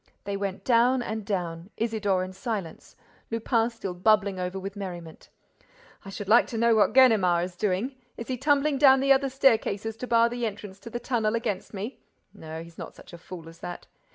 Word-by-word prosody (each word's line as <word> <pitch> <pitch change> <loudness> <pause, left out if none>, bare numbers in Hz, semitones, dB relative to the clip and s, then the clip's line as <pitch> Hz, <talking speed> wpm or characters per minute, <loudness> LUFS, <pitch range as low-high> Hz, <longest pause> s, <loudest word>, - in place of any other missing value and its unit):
They 200 0 -3
went 195 -1 -4
down 245 +1 +3
and 220 -1 -4
down, 175 -3 -4
Isidore 210 -5 0
in 185 0 -7
silence, 190 -4 -5 0.3
Lupin 230 0 +1
still 225 -6 -6
bubbling 200 +1 +2
over 180 +1 -3
with 195 +1 -6
merriment: 175 -5 -8 0.7
"I 195 - -9
should 195 0 -7
like 225 +4 +5
to 230 - -5
know 235 +1 +4
what 215 0 +3
Ganimard 200 -10 +5
is 180 -1 -10
doing? 210 +7 -1 0.2
Is 230 - -7
he 260 - -2
tumbling 285 +2 +1
down 270 -2 +7
the 275 +1 +5
other 270 0 +1
staircases 225 -5 +1
to 250 - -6
bar 230 -1 +4
the 240 0 -2
entrance 200 -2 -8
to 230 - -10
the 240 - -4
tunnel 230 -3 0
against 205 -4 -3
me? 210 +5 -6 0.3
No, 160 +1 -8
he's 170 0 -15
not - - -8
such - - -15
a - - -8
fool 170 -1 -10
as 165 0 -13
that. 175 - -7
215 Hz, 200 wpm, -26 LUFS, 185-235 Hz, 0.7 s, down